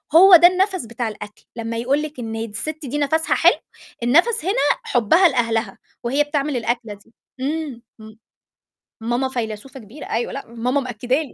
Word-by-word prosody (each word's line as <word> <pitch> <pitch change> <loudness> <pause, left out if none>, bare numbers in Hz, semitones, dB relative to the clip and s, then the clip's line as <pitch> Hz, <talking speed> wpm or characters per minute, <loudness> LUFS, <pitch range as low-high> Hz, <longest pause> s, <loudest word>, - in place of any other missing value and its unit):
هو 375 +1 +9
ده 345 +1 +9
النَفْس 370 - 0
بتاع 235 +1 -4
الأكل 210 -1 -9
لمّا 230 0 -4
يقول 265 +5 +1
لِك 305 -3 -7
إن 225 -2 -5
د - - -9
السِت 300 +9 -5
دي 275 +3 -3
نَفْسها 315 +3 +1
حلو، - - +4 0.5
النَفْس 345 - +3
هنا 390 - +1 0.3
حُبّها 290 - +4
لأهلها 230 -4 -1 0.3
وهي 275 +5 +2
بتعمل 290 -2 -2
الأكلة 235 -2 -2
دي 205 +3 -19 0.3
إمم 285 -3 -3 0.2
إمم، 220 0 -13 0.8
ماما 240 +3 -1
فيلسوفة 240 +1 -5
كبيرة 235 +6 -11
أيوه 235 +1 -1
لأ 275 - -6
ماما 240 +4 -1
مأكّده 250 0 -2
لي. 295 - -9
255 Hz, 170 wpm, -21 LUFS, 230-300 Hz, 0.8 s, هو